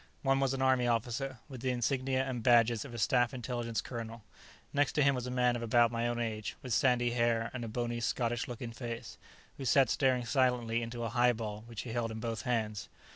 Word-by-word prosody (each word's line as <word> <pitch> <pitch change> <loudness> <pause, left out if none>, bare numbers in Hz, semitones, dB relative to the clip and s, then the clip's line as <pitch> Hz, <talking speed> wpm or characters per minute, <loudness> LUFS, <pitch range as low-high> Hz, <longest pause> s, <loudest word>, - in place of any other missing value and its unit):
One 135 -1 +3
was 135 -1 +1
an 135 - -1
Army 130 -2 +3
officer, 120 +3 -1
with 130 -5 -9
the 130 - -1
insignia 130 +2 0
and 130 -3 -3
badges 115 -2 +4
of 140 - -9
a - - -5
Staff 125 +2 +2
Intelligence 120 -2 -3
colonel. 115 -2 -7 0.5
Next 145 0 +2
to 150 - +3
him 140 0 +4
was 125 -1 -3
a - - -3
man 125 -1 +2
of 120 - -4
about 120 0 +4
my 115 0 -1
own 120 0 -1
age, 110 -2 -3
with 125 -3 -3
sandy 120 -1 +3
hair 115 -1 +1
and 130 -2 -4
a - - -4
bony, 120 +1 -2
Scottish 120 0 -1
looking 120 -1 -6
face, 115 -1 -7 0.4
who 140 - -6
sat 135 0 +4
staring 130 -3 +2
silently 120 -3 +1
into 120 0 -5
a 115 - -1
highball 115 -3 +1
which 115 -3 -6
he 120 - -6
held 115 0 -1
in 110 0 -6
both 115 0 -3
hands. 110 -5 -2
120 Hz, 220 wpm, -32 LUFS, 115-130 Hz, 0.5 s, badges